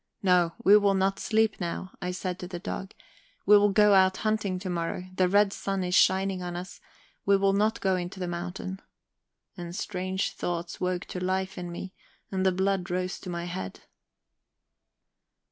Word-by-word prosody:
"No, 180 -3 +3
we 205 -1 +8
will 200 -1 +3
not 195 +1 +1
sleep 220 -1 +1
now," 175 +2 -4
I 180 - -2
said 180 0 -4
to 180 - -6
the 180 -1 -6
dog, 190 +2 -6 0.5
"we 210 - +7
will 205 0 +6
go 210 +1 +5
out 190 -1 +5
hunting 210 -3 0
tomorrow; 180 -1 -3
the 185 -1 +2
red 200 +1 +4
sun 195 -1 -2
is 180 0 -2
shining 190 0 +3
on 175 -1 -4
us, 180 +2 -7 0.4
we 200 0 +4
will 195 0 +2
not 215 +3 +1
go 190 -1 +2
into 180 +1 -5
the 180 - -2
mountain."... 180 +2 -5 0.7
And 175 -1 -7
strange 185 -1 -2
thoughts 170 -1 -4
woke 180 -1 -1
to 180 - -5
life 190 +1 -1
in 175 -1 -6
me, 185 +2 -7 0.4
and 190 -1 -1
the 190 - +4
blood 190 0 0
rose 180 0 -2
to 185 - -8
my 170 -1 -3
head. 95 - -6
185 Hz, 180 wpm, -28 LUFS, 180-195 Hz, 0.7 s, we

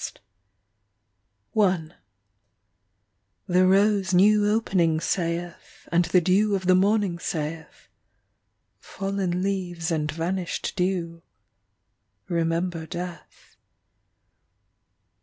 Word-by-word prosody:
CHIMES 185 -7 +2 1.5
The 180 +1 +3
rose 195 -1 +3
new 205 +2 +5
opening 180 -7 +1
saith, 170 0 -4
And 170 +1 +3
the 175 +2 +3
dew 200 +4 +2
of 190 -1 -3
the 185 - +5
morning 195 -1 +2
saith, 160 -2 -5 0.9
(Fallen 195 -2 -3
leaves 180 -4 -2
and 150 -2 -1
vanished 175 +3 -3
dew) 180 -3 -2 1.1
Remember 165 -1 -1
death. 175 +1 -9
180 Hz, 80 wpm, -25 LUFS, 170-195 Hz, 1.5 s, new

